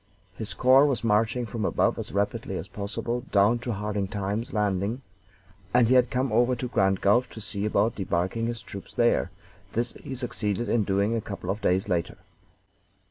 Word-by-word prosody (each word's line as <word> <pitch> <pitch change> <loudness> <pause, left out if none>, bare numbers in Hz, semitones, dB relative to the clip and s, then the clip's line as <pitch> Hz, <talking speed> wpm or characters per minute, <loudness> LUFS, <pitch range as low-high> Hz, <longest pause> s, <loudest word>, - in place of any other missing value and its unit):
His 105 +2 -5
corps 130 +3 +6
was 135 -5 -1
marching 115 +2 +2
from 110 0 -4
above - - +1
as - - -5
rapidly 100 +2 -1
as - - -6
possible 105 +4 -3
down 105 +4 +4
to 120 +1 -4
Hard 105 -2 -2
Times 105 +3 -3
landing, 105 +4 -1 0.7
and 125 -2 +6
he 125 - +3
had 125 -1 +5
come 130 +1 0
over 120 +2 +3
to 125 +1 -4
Grand 95 -5 +1
Gulf 120 +5 +3
to - - -10
see 100 -1 -3
about 105 +2 +2
debarking 95 +4 -1
his 115 0 -4
troops 100 - -10
there; 120 -5 +2 0.4
this 120 +1 -1
he 135 -2 -8
succeeded 120 -3 -2
in 115 -3 +2
doing 100 +3 +1
a 115 - -1
couple 95 -3 -4
of 105 +2 -4
days 95 +2 +1
later. 90 -4 -1
110 Hz, 185 wpm, -26 LUFS, 100-120 Hz, 0.7 s, corps